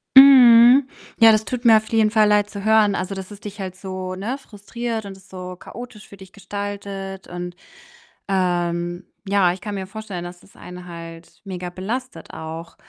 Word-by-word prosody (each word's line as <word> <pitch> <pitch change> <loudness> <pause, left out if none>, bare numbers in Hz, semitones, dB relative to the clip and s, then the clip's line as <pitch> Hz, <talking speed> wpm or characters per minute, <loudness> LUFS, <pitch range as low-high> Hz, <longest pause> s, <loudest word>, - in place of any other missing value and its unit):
Mhm, 255 -1 +8 0.3
ja, 225 -1 +8
das 215 0 +1
tut 250 -1 -5
mir 225 -2 +8
auf 220 0 -4
jeden 220 -2 +2
Fall 215 -2 +4
Leid 210 0 +2
zu 200 -1 -8
hören. 215 -2 +4
Also, 185 +2 -3
dass 190 +1 -8
es 200 - -11
dich 205 0 -9
halt 185 -1 -5
so, 185 -1 -6
ne, 225 +8 -4
frustriert 225 -1 -6
und 195 -1 -9
es 190 +1 -21
so 180 -1 -8
chaotisch 225 +2 -11
für 200 - -14
dich 190 0 -14
gestaltet. 200 -1 -6
Und, 175 0 -7 0.7
ähm 175 -1 -1 0.2
ja, 190 -3 +3
ich 185 - -11
kann 205 -2 -5
mir 190 -1 -5
vorstellen, 200 -4 -7
dass 175 0 -10
das - - -22
einen 180 0 -10
halt 170 0 -11
mega 180 -2 -6
belastet 195 +1 -6
auch. 160 +1 -8
195 Hz, 185 wpm, -21 LUFS, 180-220 Hz, 0.7 s, Mhm